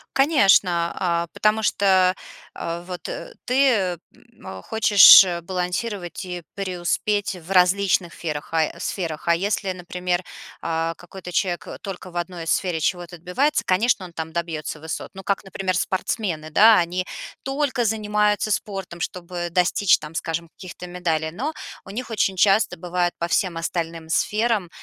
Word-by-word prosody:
Конечно, 195 - +4
а, 170 -1 0
потому 215 +1 +1
что, 190 -3 +3 0.4
э, 170 +1 -4
вот, 180 -1 -6
э, - - -7
ты, 270 +2 +4
э, 190 -7 +1 0.4
м, 95 - -10
хочешь, 210 -3 +8
э, 175 -2 -3
балансировать 180 +1 -3
и 180 -1 -5
преуспеть 195 +1 -1
в 175 +1 -11
различных 180 -1 +3
сферах, 150 -3 -5
а 160 -1 0
сферах. 165 -5 -4
А 170 - +5
если, 195 +2 -1
например, 180 0 -3 0.4
а, 165 0 -1
какой-то 180 +2 -10
человек, 175 0 -1
э, - - -7
только 190 -2 -7
в 175 - -7
одной 175 -1 -4
сфере 175 +1 0
чего-то 175 +1 -2
отбивается, 230 - 0
конечно, 200 +2 +2
он 175 - -11
там 160 -1 -6
добьётся 165 -3 -4
высот. 160 0 -6
Ну 190 0 -10
как, 200 0 -1
например, 190 -1 -2
спортсмены, 185 -4 -2
да, 215 +7 +7
они 180 +2 -1 0.4
только 270 -3 -1
занимаются 210 -1 +1
спортом, 195 -4 -3
чтобы 175 +1 -4
достичь, 180 +2 +3
там, 150 +1 -10
скажем, 165 0 -3
каких-то 180 +1 -10
медалей. 165 -3 -2
Но 270 - -3 0.3
у - - -12
них 245 +5 -5
очень 205 -3 0
часто 195 +3 +3
бывает 175 +1 -1
по 170 - -1
всем 175 0 0
остальным 165 -1 -4
сферам, 210 +1 +1
180 Hz, 150 wpm, -23 LUFS, 170-205 Hz, 0.4 s, хочешь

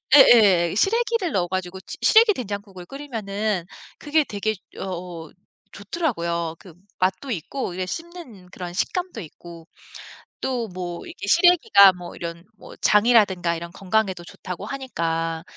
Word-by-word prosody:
예예. 200 - +6
시래기를 455 - +1
넣어 175 -2 +1
가지고 185 0 -4
시 - - -7
시래기 445 -1 +6
된장국을 200 - -7
끓이면은 215 -8 -3 0.3
그게 305 +1 +1
되게 215 -2 -2 0.2
여 - - -6
어 170 -3 -7 0.4
좋더라고요. 170 - -2
그 180 -4 -14 0.3
맛도 190 +9 0
있고 200 - -4
이래 185 0 -3
씹는 335 - -8
이제 180 -1 -17
그런 175 -2 -7
식감도 355 - -2
있고 165 0 -12 0.7
또 245 -3 -2
뭐 180 -2 -6
이게 340 - -8
시래기가 320 - +6
뭐 180 -1 -10
이런 170 0 -7
뭐 - - -13
장이라든가 205 -6 +3
이런 170 +1 -7
건강에도 195 -2 -1
좋다고 180 +3 -8
하니까 165 -11 -3
195 Hz, 310 characters per minute, -23 LUFS, 175-255 Hz, 0.7 s, 예예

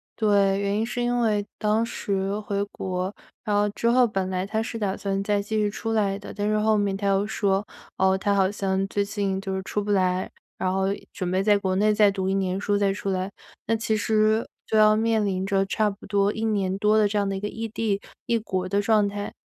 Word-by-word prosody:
对， 200 -3 +3
原 200 +1 0
因 225 - +1
是 245 +1 -3
因 245 0 +1
为 210 -3 +1
当 215 +2 +2
时 200 -2 -2
回 200 -1 -2
国， 185 +1 -3 0.3
然 210 -2 0
后 205 0 +2
之 230 +3 0
后 250 0 +5
本 190 -3 -2
来 185 0 -1
他 220 +2 -1
是 230 -1 -5
打 200 -2 -1
算 195 -1 -2
再 205 0 +1
继 215 +2 -3
续 210 -1 +2
出 225 +2 -4
来 200 -3 +1
的。 200 - -9
但 205 0 -2
是 215 - +2
后 215 0 +3
面 200 -1 0
他 200 0 -2
又 195 +1 +2
说， 200 -2 0 0.3
哦， 190 0 +3
他 200 +1 0
好 190 -1 +3
像 195 -1 -1
最 200 +1 0
近 200 -1 -2
就 195 -1 -4
是 190 - -2
出 205 +2 -2
不 205 - -2
来， 185 -1 +1 0.3
然 185 0 0
后 190 0 +1 0.3
准 185 -5 -3
备 185 +2 +1
在 210 -1 +4
国 190 -2 -1
内 210 +2 +3
再 210 -1 +5
读 190 -1 -2
1 - - +1
年 190 -1 0
书 205 0 0
再 200 -1 +2
出 200 0 -4
来。 185 0 -1 0.4
那 225 - +2
其 220 0 0
实 215 +1 +2 0.2
就 220 - -2
要 215 0 +6
面 220 0 +2
临 190 -2 -1
着 195 -1 +2
差 210 +2 +1
不 200 - -13
多 200 0 +2
1 220 - -4
年 195 -3 0
多 210 +1 +3
的 215 -1 +4
这 205 +1 -2
样 200 - 0
的 195 - -2
一 - - -3
个 205 - -3
异 225 +1 -5
地、 215 -2 -1 0.3
异 235 - +1
国 185 -4 -3
的 200 +2 +1
状 210 -1 +3
态。 205 0 -5
205 Hz, 260 characters per minute, -25 LUFS, 195-215 Hz, 0.4 s, 要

